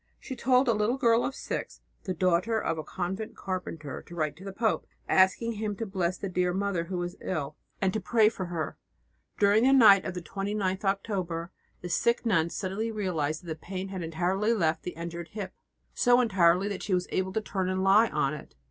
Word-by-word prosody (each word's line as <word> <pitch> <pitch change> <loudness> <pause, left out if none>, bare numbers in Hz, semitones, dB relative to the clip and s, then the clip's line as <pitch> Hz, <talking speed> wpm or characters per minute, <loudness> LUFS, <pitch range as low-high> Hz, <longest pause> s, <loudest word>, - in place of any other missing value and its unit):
She 260 - -7
told 255 +1 +3
a 235 - +4
little 215 +4 +1
girl 235 -3 +3
of 270 - -2
six, - - -5 0.2
the 185 - -1
daughter 185 +5 +2
of 165 - -1
the - - -2
convent 190 +6 -5
carpenter, 165 -6 -5
to 170 - -10
write 155 -3 -1
to 185 - -12
the 195 - -6
pope, 220 +3 0 0.2
asking 190 +5 +3
him 215 -1 -3
to 225 - -4
bless 185 -3 -1
the 200 - -4
dear 180 -1 0
Mother 195 -3 -1
who 185 +1 -4
was 175 0 -4
ill, 150 -5 -3 0.2
and 190 -1 +1
to 220 - 0
pray 215 +2 +3
for 205 -4 -2
her. 170 -3 -4 0.6
During 205 +1 +4
the 265 +1 +5
night 210 -7 +8
of 185 - -5
the 180 - -4
29th 195 -1 -2
October 185 -4 -2 0.3
the 175 - -6
sick 235 +7 +1
nun 170 -7 +2
suddenly 200 +5 -3
realized 170 -7 -2
that - - -13
the 160 - -3
pain 185 +3 -6
had 190 -2 -5
entirely 180 +7 0
left 160 -6 +1
the 180 - -6
injured 170 0 -5
hip 200 -3 -5 0.4
so 245 0 +4
entirely 190 -5 +3
that 200 -2 -4
she 195 - 0
was 180 0 -1
able 190 0 0
to 220 - 0
turn 190 -3 -2
and 185 0 -1
lie 205 +4 +5
on 150 -1 0
it. 150 - -10
190 Hz, 210 wpm, -28 LUFS, 175-215 Hz, 0.6 s, night